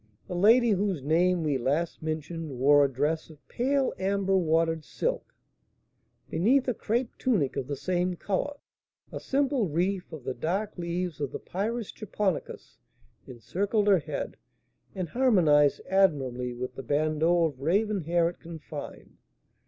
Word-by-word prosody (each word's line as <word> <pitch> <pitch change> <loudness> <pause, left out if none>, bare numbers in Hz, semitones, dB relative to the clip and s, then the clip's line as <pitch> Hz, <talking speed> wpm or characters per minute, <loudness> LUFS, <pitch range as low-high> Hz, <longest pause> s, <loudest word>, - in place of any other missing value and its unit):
The - - -5
lady 225 +6 +5
whose 195 -7 0
name 170 +3 +2
we 145 -4 0
last 145 +7 -1
mentioned 155 -2 -4
wore 145 +3 +5
a 140 - +1
dress 150 +6 -1
of 150 -2 -17
pale 270 +2 0
amber 195 0 +1
watered 165 -2 +1
silk, - - -3 0.9
beneath 250 +11 +2
a 250 - +2
crape 235 +3 -2
tunic 195 - +1
of 130 - -3
the 140 - -3
same 180 +4 -1
colour. 205 - -2 0.6
A - - -5
simple 270 -5 0
wreath 180 +4 -1
of 155 -5 -8
the 130 - -3
dark 190 - -2
leaves 175 -2 -3
of 140 - -2
the - - -4
Pyrus 220 +4 -3
Japonicus 205 -4 -4 0.5
encircled 200 - -1
her 195 -3 +6
head, 145 - -5 0.6
and 185 -4 -3
harmonised 165 - +4
admirably 135 -10 +1
with 125 +1 -5
the 135 - -7
bandeaux 155 +5 +2
of 145 -5 -2
raven 200 +6 +1
hair 170 +1 +2
it 170 - -6
confined. 160 -3 -9
175 Hz, 145 wpm, -28 LUFS, 150-200 Hz, 0.9 s, her